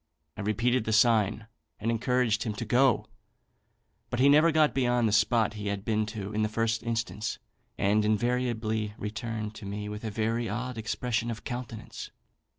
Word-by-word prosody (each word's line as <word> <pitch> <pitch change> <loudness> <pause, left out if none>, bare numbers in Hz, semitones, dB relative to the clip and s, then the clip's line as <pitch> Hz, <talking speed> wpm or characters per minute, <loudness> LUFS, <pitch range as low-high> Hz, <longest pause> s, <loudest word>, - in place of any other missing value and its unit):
I - - -6
repeated 115 +4 +1
the 110 - 0
sign, 110 -1 +3 0.3
and 115 +2 0
encouraged 115 -1 +1
him 110 -4 -2
to 110 +3 -5
go; 125 +3 +3 1.0
but 120 - -2
he 135 +2 +6
never 155 +3 +6
got 155 -1 +3
beyond 125 -3 +2
the - - +1
spot 110 0 +3
he 105 -1 -5
had 100 0 -3
been 110 -1 +1
to 105 -2 -5
in 110 - 0
the 105 - +1
first 115 +1 0
instance, 115 -2 -2 0.4
and 105 +2 +2
invariably 110 -1 0
returned 110 0 -4
to 110 - -10
me 105 +1 -4
with 105 +1 -6
a 110 - -2
very 115 +2 -1
odd 125 +4 -3
expression 115 +1 -2
of 115 -1 -5
countenance. 120 -3 -6
110 Hz, 170 wpm, -28 LUFS, 105-120 Hz, 1.0 s, he